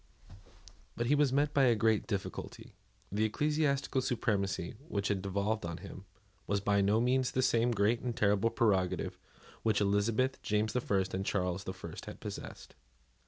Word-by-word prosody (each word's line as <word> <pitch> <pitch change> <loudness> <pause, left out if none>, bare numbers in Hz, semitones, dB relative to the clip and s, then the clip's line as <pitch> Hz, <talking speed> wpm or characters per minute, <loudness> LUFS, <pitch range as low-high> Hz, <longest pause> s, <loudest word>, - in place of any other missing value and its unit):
But 120 - 0
he 130 - +3
was 145 -2 +3
met 145 +2 +1
by 140 -2 +4
a 120 -2 +4
great 110 0 +2
difficulty. 100 -4 -5 0.4
The 105 +2 +1
ecclesiastical 145 +2 +1
supremacy 100 -8 -1
which 100 -8 -1
had 100 -2 0
devolved 100 +3 -1
on 85 -1 -4
him, 95 0 -10 0.4
was 100 0 +1
by 100 0 +2
no 100 +3 +3
means 125 +2 +2
the 130 - 0
same 120 0 +3
great 115 +1 +2
and 120 -1 -3
terrible 105 0 +3
prerogative 95 -6 0 0.4
which 110 -2 +2
Elizabeth, 105 +6 +1
James 105 +1 0
the 125 - +1
First, 95 -4 0
and 95 +1 -1
Charles 90 -1 -1
the - - -4
First - - -8
had - - -8
possessed. - - -8
110 Hz, 165 wpm, -32 LUFS, 100-125 Hz, 0.4 s, by